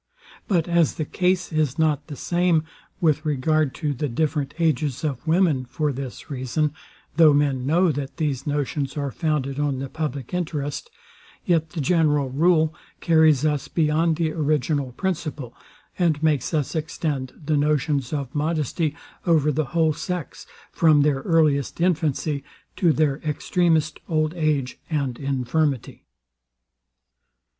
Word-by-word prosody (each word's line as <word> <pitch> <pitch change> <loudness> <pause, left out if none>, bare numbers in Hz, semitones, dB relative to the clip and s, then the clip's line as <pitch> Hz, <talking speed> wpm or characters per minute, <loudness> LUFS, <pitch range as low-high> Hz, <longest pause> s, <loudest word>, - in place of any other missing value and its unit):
But 175 -5 +1
as 170 -3 +2
the 155 - -2
case 180 +1 0
is 155 -4 0
not 150 -2 +1
the 150 - -7
same 175 0 +1 0.4
with 155 -3 +2
regard 150 0 +1
to 150 -3 -2
the 140 +2 -3
different 145 +2 -1
ages 155 -5 0
of 140 -4 -3
women, 160 -5 +3
for 140 +4 -2
this 130 -1 -7
reason, 145 +2 -1 0.4
though 155 -3 +7
men 135 -3 +1
know, 170 +3 +3
that 140 -1 -5
these 150 -4 -2
notions 145 0 -2
are 140 -2 -2
founded 145 -4 -1
on 145 -2 0
the 135 0 -5
public 140 -4 -4
interest, 150 -5 -3 0.6
yet 160 -2 +2
the 160 -1 -4
general 150 -3 +2
rule 160 +2 +3 0.3
carries 160 -4 +4
us 150 -3 0
beyond 160 +1 +1
the 160 -1 0
original 150 -3 0
principle, 155 -8 -3 0.5
and 160 -4 +1
makes 155 -3 +1
us 150 -5 -1
extend 150 -4 -3
the 155 0 +1
notions 145 -2 +1
of 140 -4 -3
modesty 155 0 -1 0.3
over 155 -3 +4
the 155 +1 0
whole 160 +1 +1
sex, 180 -1 -5 0.2
from 155 -3 +4
their 145 -2 +2
earliest 150 -2 +1
infancy 155 -4 0 0.3
to 170 -3 +3
their 150 -3 +1
extremest 160 0 0
old 155 -1 +1
age 150 -6 -1
and 140 -6 -2
infirmity. 135 0 -1
150 Hz, 140 wpm, -23 LUFS, 140-160 Hz, 0.6 s, though